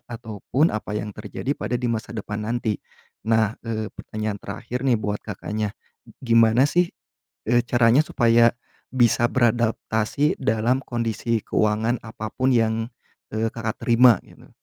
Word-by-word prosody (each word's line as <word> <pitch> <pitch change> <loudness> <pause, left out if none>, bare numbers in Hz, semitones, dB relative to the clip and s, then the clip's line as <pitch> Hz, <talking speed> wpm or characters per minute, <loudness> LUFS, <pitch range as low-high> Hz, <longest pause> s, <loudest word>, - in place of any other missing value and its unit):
ataupun 115 - -1
apa 105 0 -3
yang 105 0 -4
terjadi 105 +7 -4
pada 125 - -2
di 120 -1 -1
masa 110 0 -4
depan 105 0 -4
nanti. 115 -3 -1 0.5
Nah, 110 -1 +3
eee, 110 -2 -4
pertanyaan 110 -2 -5
terakhir 120 +1 -5
nih 130 -3 +2
buat 105 -1 -3
Kakaknya. 105 +1 -4 0.3
G - - -17 0.2
gimana 115 +2 +5
sih 175 +4 +2 0.6
e 120 0 +4
caranya 120 +3 +4
supaya 115 -3 +4 0.4
bisa 120 -2 +3
beradaptasi 120 +2 +1
dalam 120 +2 +1
kondisi 115 -1 -1
keuangan 110 +3 +1
apapun 110 +4 -2
yang, 110 -2 +3 0.6
eee, 110 +1 0
Kakak 110 -1 -5
terima, 120 0 +5
gitu? - - -19
115 Hz, 135 wpm, -23 LUFS, 110-120 Hz, 0.6 s, gimana